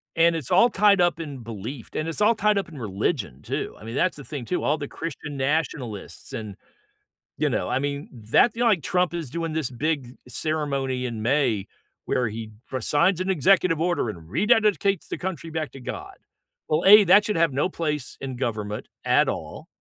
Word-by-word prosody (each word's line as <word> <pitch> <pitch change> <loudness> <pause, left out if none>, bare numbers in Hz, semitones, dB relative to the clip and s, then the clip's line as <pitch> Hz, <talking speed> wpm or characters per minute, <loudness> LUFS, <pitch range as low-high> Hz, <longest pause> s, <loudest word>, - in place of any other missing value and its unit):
and 165 0 +4
it's 155 -2 -5
all 210 +7 +6
tied 200 -3 +4
up 175 -1 +2
in 145 -5 -6
belief, 115 +2 -7
and 155 - -1
it's 165 - -4
all 220 +2 +5
tied 210 0 +2
up 195 - -1
in 155 - -11
religion 100 - -2
too, - - -4
I - - -13
mean, 115 +3 -6
that's 185 -1 +1
the 145 - -9
thing 140 -5 -5
too, 180 - -2
all 150 - +2
the 145 -2 -5
Christian 150 -3 -6
nationalists 135 -5 -3
and, 110 -5 -5 0.8
you - - +1
know, - - -1
I 130 - +1
mean, 140 0 -3 0.2
that 235 - +6
you 235 - -3
know, 240 - +4
like, 180 -9 +2
Trump 180 -1 +1
is 165 -7 -4
doing 165 +1 -3
this 155 -5 -1
big 135 -1 -2
ceremony 140 -3 -2
in 115 -3 -4
May, 120 -5 +1 0.4
where 125 -2 +1
he 110 0 -7 0.2
re-signs 160 - +2
an 190 - -2
executive 180 -1 +3
order, 170 -9 0
and 85 -5 -9
rededicates 210 - +2
the - - -4
country 175 -3 -5
back 155 -1 -3
to 135 - -11
God. 125 - -7 0.5
Well, 155 +2 +1
A, 210 +2 +10
that 205 +2 +6
should 210 - -1
have 165 -4 +3
no 145 +7 +1
place 150 -6 -3
in 130 -2 -4
government 105 -4 -3 0.2
at - - +4
all, - - -6
150 Hz, 200 wpm, -25 LUFS, 125-175 Hz, 0.8 s, A